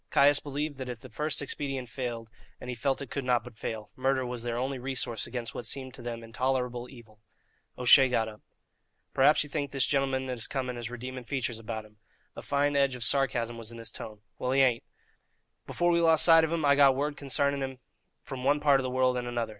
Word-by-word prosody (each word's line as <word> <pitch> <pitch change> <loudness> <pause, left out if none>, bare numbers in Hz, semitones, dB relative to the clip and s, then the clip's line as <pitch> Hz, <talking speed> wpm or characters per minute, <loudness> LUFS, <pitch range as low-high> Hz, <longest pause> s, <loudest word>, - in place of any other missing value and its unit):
Caius 145 +1 +5
believed 145 0 -4
that 130 -1 -5
if 120 -2 -6
the 130 - -11
first 150 +4 -2
expedient 135 -2 -4
failed, 120 -2 -5 0.3
and 125 - -6
he - - -4
felt 135 +4 -1
it 135 - -11
could 140 - -3
not 125 -1 +2
but 110 - -13
fail, 110 -2 -5
murder 130 0 0
was 125 -1 -5
their 120 0 -3
only 130 +1 -2
resource 125 -4 -1
against 120 -2 -5
what 120 - -5
seemed 130 -1 -3
to - - -11
them 115 -1 -5
intolerable 125 +1 -2
evil. 110 -5 -15 0.6
O'Shea 130 +2 +7
got 115 -3 +1
up. 105 -1 -10 0.7
"Perhaps 145 +3 +5
ye - - -9
think 145 -1 -3
the 140 - -7
gintleman 135 -1 +1
that 125 -2 -4
is - - -6
coming 130 -2 -3
has 120 -1 -5
redeeming 125 +1 -7
features 120 -4 -2
about 110 -1 -5
him?" 105 0 -20 0.4
A - - -7
fine 145 0 0
edge 140 -2 +2
of 125 - -5
sarcasm 120 -2 +2
was 115 0 -7
in 115 - -9
his 115 -1 -6
tone. 105 -1 -9 0.2
"Well, 125 - -2
he 135 - +4
hain't. 125 -3 +3 0.8
Before 175 0 +1
we 170 0 +3
lost 160 -2 +6
sight 165 -1 +7
of 160 - 0
him, 165 -3 0
I 140 0 +5
got 140 -2 +6
word 145 +2 -1
concarning 140 0 0
him 135 -1 -4 0.5
from 130 -2 -7
one 145 +2 +3
part 145 -2 +4
of - - -2
the 130 - -2
world 130 0 +2
and 120 0 -3
another. 120 -2 -2
130 Hz, 230 wpm, -29 LUFS, 120-140 Hz, 0.8 s, O'Shea